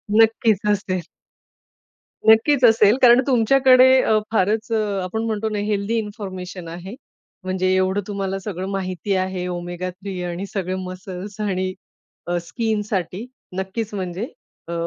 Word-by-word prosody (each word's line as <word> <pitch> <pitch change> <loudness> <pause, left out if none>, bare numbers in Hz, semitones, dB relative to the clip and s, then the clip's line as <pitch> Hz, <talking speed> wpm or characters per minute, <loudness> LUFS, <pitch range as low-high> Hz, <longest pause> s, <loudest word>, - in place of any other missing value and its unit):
नक्कीच 225 -1 +4
असेल. 190 -3 -1 1.2
नक्कीच 245 +5 +5
असेल, 225 -1 +6
कारण 245 +1 +7
तुमच्याकडे 255 +1 +5 0.2
अ, 220 -3 +3
फारच 215 +2 +1
अ, 225 - +2 0.2
आपण 220 +5 -3
म्हणतो 220 -1 -1
ना 210 -1 -2
हेल्थी 210 +2 0
इन्फॉर्मेशन 190 -4 -6
आहे. 180 +6 -8 0.5
म्हणजे 185 0 -1
एवढं 190 +2 +1
तुम्हाला 195 -2 -2
सगळं 190 -2 -5
माहिती 190 0 -2
आहे 185 -1 -2
Omega-3 180 +2 -5
आणि 175 +3 -4
सगळे 185 -2 -2
मसल्स 185 +3 -8
आणि 185 -2 -1 0.5
अ, 175 0 -1
स्किनसाठी, 210 -3 -2 0.3
नक्कीच 205 +3 -3
म्हणजे. 185 +2 -3 0.4
अ, 170 - -5
200 Hz, 125 wpm, -22 LUFS, 185-220 Hz, 1.2 s, कारण